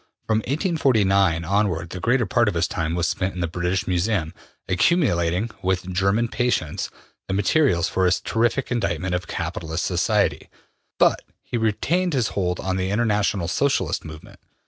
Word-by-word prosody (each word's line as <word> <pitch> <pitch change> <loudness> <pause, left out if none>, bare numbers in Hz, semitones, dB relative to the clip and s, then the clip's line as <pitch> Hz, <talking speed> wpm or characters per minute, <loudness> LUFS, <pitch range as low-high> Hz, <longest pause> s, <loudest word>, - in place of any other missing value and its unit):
From 110 -1 +2
1849 105 - +2
onward 90 -3 0
the 90 - -5
greater 120 +6 +2
part 120 +4 +2
of 100 - 0
his 85 +1 +1
time 80 -1 -2
was 85 -1 +1
spent 95 +5 -2
in - - -5
the 85 - 0
British 90 +2 -1
Museum, 90 -2 0 0.3
accumulating, 90 - +1
with 95 0 -1
German 100 +5 +2
patience, 125 +1 -1 0.4
the 95 - -1
materials 100 - +2
for 95 - 0
his 90 - +3
terrific 120 +4 0
indictment 95 -7 -1
of 90 0 -2
capitalist 80 +1 -3
society, 85 -2 0 0.5
but - - +3 0.2
he - - -6
retained 155 - 0
his 125 -5 +1
hold 90 -3 -1
on 95 0 -2
the 95 0 -1
International 105 -4 +1
Socialist 95 - 0
movement. 80 -1 -11
95 Hz, 155 wpm, -23 LUFS, 85-115 Hz, 0.5 s, his